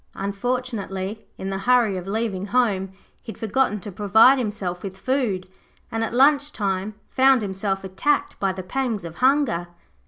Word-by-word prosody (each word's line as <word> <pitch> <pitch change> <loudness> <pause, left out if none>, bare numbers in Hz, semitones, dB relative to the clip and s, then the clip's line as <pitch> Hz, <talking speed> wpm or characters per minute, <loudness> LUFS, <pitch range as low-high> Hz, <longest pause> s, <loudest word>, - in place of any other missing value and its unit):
Unfortunately, 200 -1 -3
in 190 +1 -4
the 195 - -2
hurry 235 -1 +3
of 180 0 -5
leaving 205 -2 -2
home, 200 -5 +1 0.3
he - - -7
had - - -19
forgotten 225 -1 0
to 205 - -7
provide 220 +7 +5
himself 205 -6 -3
with 190 -1 -7
food, 225 -6 -1 0.4
and 225 0 -1
at 225 - -2
lunch 285 +3 +4
time 200 -2 -2 0.2
found 265 -2 +4
himself 195 0 -2
attacked 195 +11 0
by 195 -1 +1
the 185 0 -6
pangs 230 -2 -2
of 165 -1 -8
hunger. 255 -10 +2
210 Hz, 160 wpm, -23 LUFS, 190-250 Hz, 0.4 s, provide